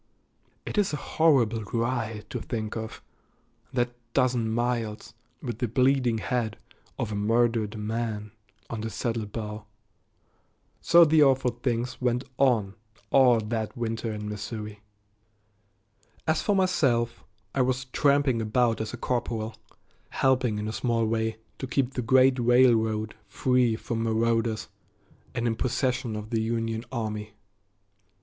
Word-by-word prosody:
It -, -, -1 dB
is 195 Hz, -6 st, +1 dB
a 150 Hz, -, -4 dB
horrible 125 Hz, -9 st, +4 dB
ride 115 Hz, -1 st, -2 dB
to -, -, -3 dB
think 110 Hz, -2 st, -4 dB
of, 110 Hz, -1 st, -6 dB, 0.7 s
that 120 Hz, -2 st, 0 dB, 0.2 s
dozen 125 Hz, -4 st, +2 dB
miles, 120 Hz, -1 st, -2 dB, 0.3 s
with 120 Hz, -4 st, -4 dB
the 125 Hz, -, 0 dB
bleeding 125 Hz, 0 st, +2 dB
head 110 Hz, -2 st, -2 dB, 0.4 s
of 110 Hz, -, -2 dB
a -, -, -2 dB
murdered 115 Hz, 0 st, +1 dB
man 105 Hz, -1 st, -3 dB, 0.4 s
on 115 Hz, -2 st, -5 dB
the 110 Hz, -, -3 dB
saddle 115 Hz, -1 st, -2 dB
bow. 105 Hz, 0 st, -6 dB, 1.2 s
So 170 Hz, 0 st, +7 dB
the 155 Hz, 0 st, +4 dB
awful 135 Hz, -3 st, +4 dB
things 120 Hz, +1 st, -2 dB
went 125 Hz, 0 st, +1 dB, 0.2 s
on 115 Hz, -8 st, +3 dB, 0.4 s
all 125 Hz, -4 st, +6 dB
that 110 Hz, +2 st, -3 dB
winter 115 Hz, -1 st, -2 dB
in 105 Hz, -1 st, -5 dB
Missouri. 105 Hz, 0 st, -6 dB, 1.4 s
As 160 Hz, 0 st, +1 dB
for 205 Hz, -, +1 dB
myself, 125 Hz, -11 st, +1 dB, 0.3 s
I 135 Hz, -, +2 dB
was 125 Hz, 0 st, 0 dB
tramping 140 Hz, -2 st, +2 dB
about 115 Hz, +1 st, +1 dB
as 110 Hz, +1 st, -4 dB
a -, -, -11 dB
corporal, 115 Hz, -2 st, -2 dB, 0.6 s
helping 130 Hz, -5 st, +2 dB
in 105 Hz, 0 st, -3 dB
a 110 Hz, -, -3 dB
small 115 Hz, +2 st, 0 dB
way 110 Hz, 0 st, -1 dB, 0.2 s
to 135 Hz, -, -4 dB
keep 130 Hz, +1 st, 0 dB
the 125 Hz, -, -2 dB
great 130 Hz, +2 st, +4 dB
railroad 115 Hz, -3 st, +3 dB
free 125 Hz, +2 st, +2 dB
from 115 Hz, 0 st, -3 dB
marauders 115 Hz, 0 st, +1 dB, 0.7 s
and 120 Hz, -1 st, -1 dB
in 115 Hz, -1 st, +1 dB
possession 125 Hz, -2 st, -1 dB
of 105 Hz, +2 st, -6 dB
the 115 Hz, -1 st, +1 dB
Union 115 Hz, 0 st, -2 dB
army. 105 Hz, -3 st, -4 dB
115 Hz, 135 wpm, -27 LUFS, 110-125 Hz, 1.4 s, So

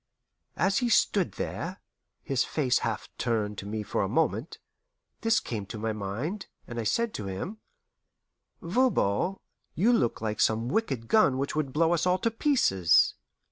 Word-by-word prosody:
As 195 Hz, +1 st, +2 dB
he 245 Hz, -, 0 dB
stood 200 Hz, -4 st, +2 dB
there, 180 Hz, +4 st, -4 dB, 0.5 s
his 135 Hz, -2 st, +1 dB
face 130 Hz, -5 st, +1 dB
half -, -, -3 dB
turned 105 Hz, -3 st, -1 dB
to 100 Hz, -, -7 dB
me 105 Hz, +1 st, -3 dB
for -, -, -1 dB
a -, -, -1 dB
moment, -, -, 0 dB, 0.6 s
this 225 Hz, 0 st, +3 dB
came 105 Hz, -4 st, -5 dB
to 110 Hz, -, -7 dB
my 110 Hz, +1 st, -2 dB
mind, 115 Hz, -, -4 dB, 0.2 s
and 120 Hz, -1 st, -6 dB
I -, -, -1 dB
said 230 Hz, -, 0 dB
to 105 Hz, -, -5 dB
him, 160 Hz, -, -5 dB, 1.0 s
"Voban, 190 Hz, -, +1 dB, 0.4 s
you 220 Hz, +9 st, +3 dB
look 120 Hz, -, +1 dB
like 110 Hz, -1 st, -2 dB
some 115 Hz, +2 st, +2 dB
wicked 135 Hz, -, -1 dB
gun 140 Hz, -, +4 dB
which 140 Hz, +3 st, -2 dB
would 150 Hz, -3 st, -1 dB
blow 165 Hz, +4 st, +2 dB
us 170 Hz, +1 st, +1 dB
all 180 Hz, 0 st, +3 dB
to 230 Hz, -, 0 dB
pieces." 220 Hz, -, +3 dB
135 Hz, 165 wpm, -28 LUFS, -, 1.0 s, gun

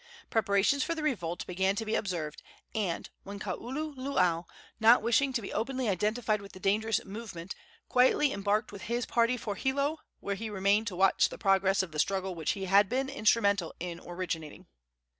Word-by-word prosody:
Preparations 220 Hz, +5 st, +2 dB
for 335 Hz, -, -1 dB
the 315 Hz, -, -4 dB
revolt 175 Hz, -, -2 dB
began 190 Hz, +2 st, 0 dB
to 225 Hz, -, -3 dB
be 215 Hz, -, -2 dB
observed, 165 Hz, -6 st, -2 dB, 0.3 s
when 200 Hz, -6 st, -1 dB, 0.3 s
Kaululaau, 245 Hz, -, -1 dB, 0.3 s
not 225 Hz, +1 st, +6 dB
wishing 235 Hz, +4 st, +3 dB
to 240 Hz, -4 st, -2 dB
be -, -, -6 dB
openly 255 Hz, +1 st, -1 dB
identified 215 Hz, +3 st, 0 dB
with 200 Hz, -, -12 dB
the 185 Hz, -, -10 dB
dangerous 215 Hz, +3 st, +1 dB
movement, 195 Hz, -4 st, -7 dB, 0.3 s
quietly 260 Hz, +3 st, +4 dB
embarked 205 Hz, +2 st, 0 dB
with 200 Hz, -2 st, -9 dB
his 240 Hz, 0 st, 0 dB
party 235 Hz, +1 st, +2 dB
for 210 Hz, -2 st, -4 dB
Hilo, 280 Hz, +8 st, 0 dB, 0.2 s
where 200 Hz, -, -3 dB
he 220 Hz, +3 st, -5 dB
remained 205 Hz, +2 st, +2 dB
to 195 Hz, -, -3 dB
watch 190 Hz, +1 st, +4 dB
the -, -, -8 dB
progress 195 Hz, -1 st, +3 dB
of 180 Hz, -, -7 dB
the 155 Hz, -, -5 dB
struggle 190 Hz, +2 st, 0 dB
which 160 Hz, -3 st, -1 dB
he 195 Hz, -1 st, -4 dB
had 195 Hz, +1 st, +5 dB
been 265 Hz, +2 st, 0 dB
instrumental 205 Hz, -, +2 dB
in 175 Hz, -1 st, -5 dB
originating. 175 Hz, -3 st, -5 dB
205 Hz, 175 wpm, -30 LUFS, 190-235 Hz, 0.3 s, not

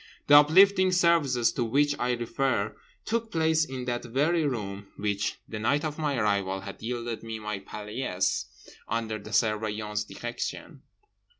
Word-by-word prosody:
The 145 Hz, -, +7 dB
uplifting 185 Hz, +6 st, +6 dB
services 165 Hz, -9 st, +3 dB
to 120 Hz, -, -1 dB
which 145 Hz, +5 st, +2 dB
I 125 Hz, 0 st, +1 dB
refer 120 Hz, -2 st, -1 dB, 0.3 s
took 230 Hz, 0 st, -1 dB
place 160 Hz, -1 st, +2 dB
in 130 Hz, -4 st, -5 dB
that 120 Hz, -1 st, -2 dB
very 150 Hz, +6 st, +1 dB
room 100 Hz, -6 st, -4 dB
which 100 Hz, -1 st, -1 dB
(the 110 Hz, -, -6 dB
night 145 Hz, +8 st, +1 dB
of 150 Hz, 0 st, -4 dB
my 145 Hz, -3 st, 0 dB
arrival) 100 Hz, -3 st, 0 dB
had 100 Hz, 0 st, -9 dB
yielded 120 Hz, 0 st, -4 dB
me 115 Hz, -1 st, -5 dB
my 105 Hz, -2 st, -4 dB
paillasse 105 Hz, 0 st, -2 dB, 0.4 s
under 110 Hz, -2 st, -2 dB
the 100 Hz, -, -11 dB
Surveillant's 105 Hz, -1 st, 0 dB
direction. 120 Hz, 0 st, -6 dB
120 Hz, 145 wpm, -27 LUFS, 105-145 Hz, 0.4 s, The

